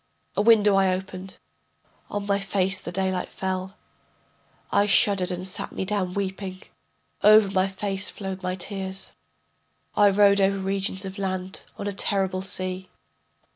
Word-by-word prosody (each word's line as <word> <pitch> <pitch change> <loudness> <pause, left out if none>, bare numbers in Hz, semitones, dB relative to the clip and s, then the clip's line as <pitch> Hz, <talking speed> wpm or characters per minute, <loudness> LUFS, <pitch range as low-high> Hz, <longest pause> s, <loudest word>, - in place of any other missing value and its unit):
A - - +2
window 210 -2 +6
I 190 -1 +4
opened, 185 0 -5 0.7
on 205 0 -3
my 200 0 +1
face 195 -1 0
the 175 - -6
daylight 185 0 -1
fell. 190 +1 -3 1.0
I 205 - +3
shuddered 200 -2 +4
and 180 0 -3
sat 185 - -3
me - - -3
down 190 -3 -1
weeping, 190 -1 -4 0.6
Over 210 -1 +7
my 190 -1 +2
face 195 0 -3
flowed 190 -2 -6
my 185 0 -2
tears. 190 0 -4 0.8
I 205 -1 +6
rode 200 0 +5
over 195 0 +3
regions 195 0 -2
of 190 +1 -7
land, 185 -1 -3
on 200 - -5
a 205 - -2
terrible 190 -1 0
sea. 185 0 -4
190 Hz, 145 wpm, -25 LUFS, 185-200 Hz, 1.0 s, Over